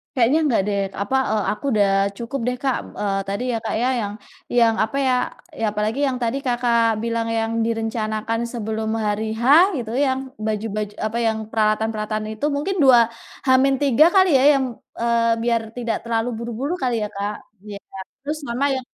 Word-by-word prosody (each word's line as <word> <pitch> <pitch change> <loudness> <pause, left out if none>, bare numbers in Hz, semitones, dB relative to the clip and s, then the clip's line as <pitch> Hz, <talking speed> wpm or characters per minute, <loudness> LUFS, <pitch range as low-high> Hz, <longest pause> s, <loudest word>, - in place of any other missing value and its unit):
Kayaknya 255 +6 +3
nggak 235 -7 +2
deh, 200 -1 0 0.2
apa, 235 +7 -1 0.2
eee, 215 -2 +1
aku 215 - -13
udah 205 -2 +3 0.3
cukup 250 +4 -4
deh 250 - 0
Kak, 265 -2 +1 0.2
eee, 195 -1 0
tadi 200 +5 -2
ya - - 0
Kak - - -1
ya, 255 - +2
yang 205 0 -4 0.4
yang, 230 -1 +5
apa 220 +6 -3
ya, 255 - +3 0.5
ya 225 - +1
apalagi 215 +5 -1
yang 255 -1 -1
tadi 235 +4 0
Kakak 235 -2 +2
bilang 230 0 -1
yang 225 0 -1
direncanakan 225 -1 -2
sebelum 220 -1 -3 0.2
hari 210 +1 -1
H, 235 - -4 0.3
gitu, 225 -2 -5
yang 260 0 0 0.3
baju-baju 210 -1 -2
apa 230 +2 -4
yang 220 0 0 0.2
peralatan-peralatan 215 0 0
itu, 220 +7 -3
mungkin 350 +7 -1
2 255 -3 +7 0.5
H-3 270 +2 +4
kali 375 -1 +6
ya, - - +2
eee, 235 -2 -1
biar 235 -1 +2 0.2
tidak 235 -2 -1
terlalu 230 +1 -1
buru-buru 240 +7 -3
kali 250 -2 0
ya - - -6
Kak? 205 +1 -3 0.3
Iya. 205 -1 -8 0.5
Terus 300 +2 -2
sama 245 +4 -1
yang 260 -1 -5
230 Hz, 170 wpm, -22 LUFS, 215-250 Hz, 0.5 s, 2